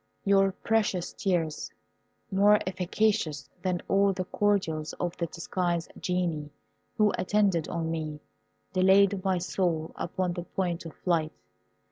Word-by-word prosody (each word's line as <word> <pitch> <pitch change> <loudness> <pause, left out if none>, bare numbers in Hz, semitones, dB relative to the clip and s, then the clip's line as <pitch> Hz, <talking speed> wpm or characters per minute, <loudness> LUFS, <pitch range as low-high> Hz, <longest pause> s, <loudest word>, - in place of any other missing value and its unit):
Your 195 -1 +4
precious 205 -5 0
tears, 170 -6 -1 0.6
more 205 +2 +6
efficacious 185 -5 0
than 180 -2 -1
all 195 0 +3
the 185 0 -3
cordials 185 -7 0
of 175 0 -3
the 170 - -1
disguised 170 0 -2
Genii 170 -5 -1 0.5
who 210 -2 +4
attended 185 -3 +2
on 165 -1 -2
me, 155 -2 -4 0.5
delayed 190 +1 +4
my 190 -2 +2
soul 175 -3 -1
upon 180 +1 -2
the 175 - -4
point 175 -2 -3
of 160 - -11
flight. 165 -3 0
180 Hz, 125 wpm, -28 LUFS, 165-195 Hz, 0.6 s, more